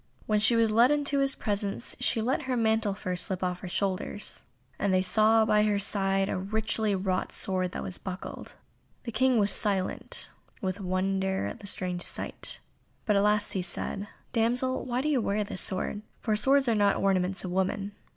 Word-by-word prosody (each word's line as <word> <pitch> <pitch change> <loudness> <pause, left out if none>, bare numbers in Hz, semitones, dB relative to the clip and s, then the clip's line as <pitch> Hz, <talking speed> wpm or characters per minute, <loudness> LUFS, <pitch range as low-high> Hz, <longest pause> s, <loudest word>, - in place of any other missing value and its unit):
When 215 -1 +2
she 220 +3 +3
was 225 -1 +3
led 235 +4 +5
into 290 -1 +1
his 275 0 +2
presence 205 +1 -2
she 235 -3 +1
let 260 +6 0
her 250 - +1
mantle 220 -2 +2
of - - -11
fur 185 -3 -3
slip 185 +1 -3
off 180 -1 -1
her 185 - -7
shoulders, 195 +2 -2 0.3
and 200 - +1
they 185 0 +3
saw 215 +3 +4
that - - +4
by 210 - +4
her 210 -1 +2
side 195 -1 +1
a - - -2
richly 215 +1 -1
wrought 185 -1 -1
sword 185 -1 0
was 185 - -4
buckled. 185 0 -7 0.5
The 235 - -5
King 255 +2 +3
was 205 -1 +3
silent 195 -3 +1 0.3
with 190 0 -3
wonder 190 +1 0
at - - -5
the 205 - -9
strange 180 -2 -3
sight, - - -2 0.5
but 210 - +2
at 200 - +4
last 210 0 +2
he 190 - -1
said, 190 +3 -4 0.3
"Damsel, 245 +3 +1
why 250 0 -1
do 295 - -2
you 285 -5 +2
wear 210 0 0
this 200 - -5
sword? 190 +2 -2 0.2
for 215 -2 0
swords 270 +5 +3
are 230 - +3
not 205 -2 +3
the - - -3
ornaments 190 -1 +2
of 180 - -4
women." 195 +2 -1
205 Hz, 200 wpm, -28 LUFS, 190-225 Hz, 0.5 s, led